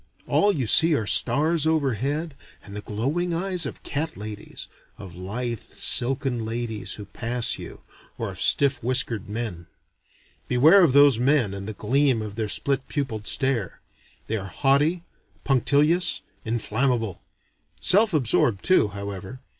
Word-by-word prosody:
All 205 - +2
you 140 -10 -2
see 160 +7 +5
are 110 - -1
stars 155 - +2
overhead 145 +1 -1 0.3
and 100 0 -11
the 105 - -5
glowing 145 +13 -2
eyes 180 -3 -1
of - - -9
cat 160 +3 -3
ladies, 105 0 -7 0.3
of 95 -4 -10
lithe 110 +6 -4
silken 125 -1 -1
ladies 115 -1 -4
who 105 - -9
pass 120 +2 -1
you, - - -10 0.3
or - - -4
of - - -7
stiff 140 -3 +3
whiskered 115 -4 +1
men. 105 -6 -5 0.8
Beware 155 +10 +5
of 150 -7 +3
those 140 -4 +6
men 125 -5 +2
and 100 +1 -6
the - - -5
gleam 130 +4 +1
of 105 -2 -7
the 110 0 -3
split 135 +4 -1
pupiled 120 -8 -4
stare. 130 -8 0 0.5
They 110 - -2
are 95 -2 -6
haughty, 145 - +1 0.4
punctilious, 145 +6 +2 0.2
inflammable: 115 -1 -1 0.6
self 210 +4 +3
absorbed 120 - +2
too, 185 - +4
however. 100 +3 -7
125 Hz, 140 wpm, -24 LUFS, 110-145 Hz, 0.8 s, those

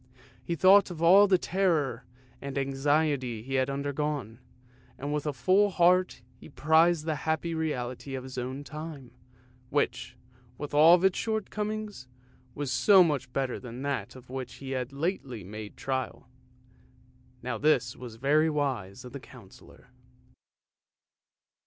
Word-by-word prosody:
He 170 - -2
thought 195 +5 +6
of 170 -2 -6
all 195 +4 +7
the 190 -2 +4
terror 165 -10 0 0.4
and 140 0 -5
anxiety 135 -3 0
he 135 +2 -7
had 130 0 +1
undergone, 140 -4 -3 0.6
and 145 +2 -4
with 150 0 -2
a - - +1
full 185 - +3
heart 180 -6 +2 0.2
he - - -13
prized 160 +2 +3
the 155 -2 -1
happy 160 +1 -1
reality 135 -4 -3
of 130 - -5
his 130 0 -9
own 130 +3 -4
time, 150 -4 -8 0.6
which, 125 -3 -2 0.4
with 145 -1 -7
all 165 +5 +6
its 190 - +2
shortcomings, 215 - -4 0.5
was 145 -2 -3
so 190 - +6
much 140 -6 -2
better 130 -1 -2
than 125 +1 -8
that 140 -1 -3
of 130 -1 -14
which 130 -1 -6
he 135 -1 -8
had 130 -1 -3
lately 140 - -3
made 105 +2 -9
trial. 130 -2 -4 1.2
Now 125 - -3
this 130 -5 +2
was 120 -2 -9
very 150 +6 +2
wise 130 -10 -3
of 125 - -10
the 140 - -6
Councillor. - - -16
145 Hz, 140 wpm, -28 LUFS, 130-165 Hz, 1.2 s, all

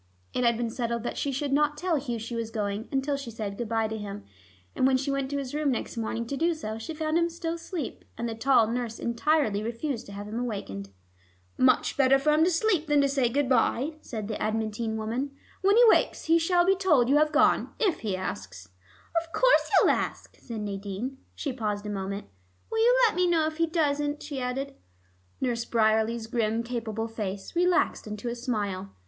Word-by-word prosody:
It 250 - 0
had 235 -1 +3
been 235 -1 -2
settled 235 -1 -2
that - - -3
she 280 - -1
should 275 +1 -2
not 295 +1 +2
tell 355 +1 0
Hugh 250 -4 -3
she 230 +2 -6
was 230 -1 -3
going, 210 -1 -3
until 275 +1 0
she 275 -3 -7
said 210 -3 -5
good 230 +1 -4
by 225 -1 +1
to 220 0 -4
him, 205 0 -6 0.5
and 260 - +3
when 265 -1 +4
she 275 +2 -2
went 275 -1 -1
to 285 - -2
his 275 -2 -4
room 300 -1 +1
next 250 - -2
morning 230 0 -2
to 275 - -4
do 330 +3 +1
so, 220 -7 -5
she 310 +8 -6
found 310 +1 +1
him 340 0 +2
still 335 0 -3
asleep, 335 -3 -5
and 235 - -2
the 230 - -3
tall 235 0 +4
nurse 230 0 -3
entirely 235 -3 +1
refused 235 +3 -3
to - - -9
have 205 +1 -6
him 220 +3 -4
awakened. 195 - -4 0.7
"Much 255 0 +3
better 270 -1 +5
for 290 +3 +2
him 305 +1 +4
to 345 - +4
sleep 345 -2 +1
than 295 -1 +4
to 280 - +3
say 270 -3 +1
good 280 +3 +1
by," 260 +2 +2
said 215 -4 -5
this 215 - -4
adamantine 220 +1 -1
woman. 245 +6 -3 0.3
"When 400 +3 +4
he 485 - +8
wakes, - - +3
he 330 +1 +4
shall 350 +1 +3
be 385 +1 +4
told 320 -11 +3
you 280 +3 +4
have 305 0 +3
gone, 310 0 +3
if 400 -8 +1
he 205 -4 -2
asks." 95 - -6 0.5
"Of 330 0 -14
course - - +4
he'll - - +5
ask," - - -3
said 230 -3 -6
Nadine. 205 +5 -4 0.2
She 280 - -3
paused 210 -4 -3
a 210 - -3
moment. 200 0 -4 0.5
"Will 450 - 0
you 480 +2 +5
let 430 - -2
me 360 0 +3
know 330 -3 +3
if 310 0 -3
he 330 0 +2
doesn't?" 295 -3 0
she 285 -3 -5
added. 270 +2 -3 0.7
Nurse 240 -3 0
Bryerley's 220 0 +2
grim 225 0 0
capable 225 -2 -3
face 205 - -5
relaxed 355 -8 +2
into 210 +3 -4
a - - -2
smile. 205 -6 -3
245 Hz, 215 wpm, -27 LUFS, 220-300 Hz, 0.7 s, he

